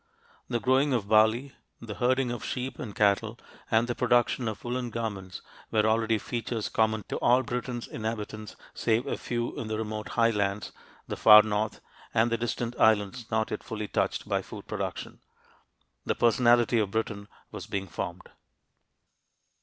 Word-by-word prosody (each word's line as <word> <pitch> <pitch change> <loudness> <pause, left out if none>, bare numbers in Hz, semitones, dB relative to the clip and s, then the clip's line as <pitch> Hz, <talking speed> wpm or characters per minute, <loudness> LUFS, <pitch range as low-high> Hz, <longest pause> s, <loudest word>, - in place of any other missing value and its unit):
The 120 -1 0
growing 130 +4 +2
of 110 -5 -1
barley, 110 +5 +3 0.3
the 115 -2 -7
herding 125 +2 +1
of 120 - -5
sheep 130 +1 -4
and 105 -5 -6
cattle, 105 +2 +2 0.3
and 115 +1 +3
the 120 - -1
production 120 0 +2
of 110 - -5
woolen 125 0 -3
garments 100 -5 -5 0.3
were 110 -1 +2
already 110 0 +2
features 115 0 -3
common 110 -1 +1
to - - -2
all 125 +2 +3
Britain's 120 0 -4
inhabitants 110 -1 -5 0.2
save 115 +3 +1
a 140 - -2
few 120 -1 -3
in 115 - -4
the 110 0 -2
remote 110 -1 -4
highlands, 105 -4 +1 0.4
the - - -3
far 105 -1 +9
north, 110 0 -2 0.3
and 115 +1 +3
the 115 - +1
distant 120 0 -2
islands 110 +2 +2
not 110 0 0
yet - - -3
fully 110 -2 -5
touched - - -1
by - - 0
food - - -10
production. - - -5 0.8
The - - -1
"personality 120 0 +4
of 105 -3 0
Britain" 105 -1 -3 0.2
was - - -7
being 95 -1 -3
formed. 90 0 -6
110 Hz, 160 wpm, -28 LUFS, 105-120 Hz, 0.8 s, far